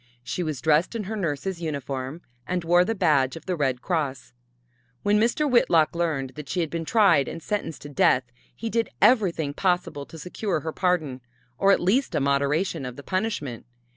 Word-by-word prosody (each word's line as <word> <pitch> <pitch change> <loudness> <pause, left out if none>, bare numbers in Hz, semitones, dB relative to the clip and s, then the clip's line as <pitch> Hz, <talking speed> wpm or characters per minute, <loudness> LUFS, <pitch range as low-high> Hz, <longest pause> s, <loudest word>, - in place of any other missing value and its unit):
She 180 - -3
was 155 -5 -3
dressed 155 +7 +2
in 225 - -2
her 215 +3 -4
nurse's 175 -1 -3
uniform 140 0 -4 0.2
and 180 -1 -1
wore 175 +2 +5
the 225 +5 -2
badge 150 -9 +2
of 165 - -10
the 185 - -1
Red 135 -5 -1
Cross. 140 -10 -2 0.7
When 205 +1 +3
Mr. 240 +7 +2
Whitlock 170 - +4
learned 155 -6 -1
that 140 0 -9
she 175 - 0
had 160 -3 -2
been 165 -1 -3
tried 200 - +4
and 165 - -5
sentenced 185 -4 -4
to 145 - -8
death 130 -2 +3 0.3
he 230 - -5
did 230 -1 0
everything 190 - +3
possible 175 -5 -1
to 165 - -11
secure 180 +1 -3
her 160 - -4
pardon, 160 -8 0 0.4
or 195 - +5
at - - +4
least 230 +10 +1
a - - +2
moderation 140 +4 0
of 125 -1 -6
the 140 - -10
punishment. 185 - -3
165 Hz, 190 wpm, -25 LUFS, 140-190 Hz, 0.7 s, wore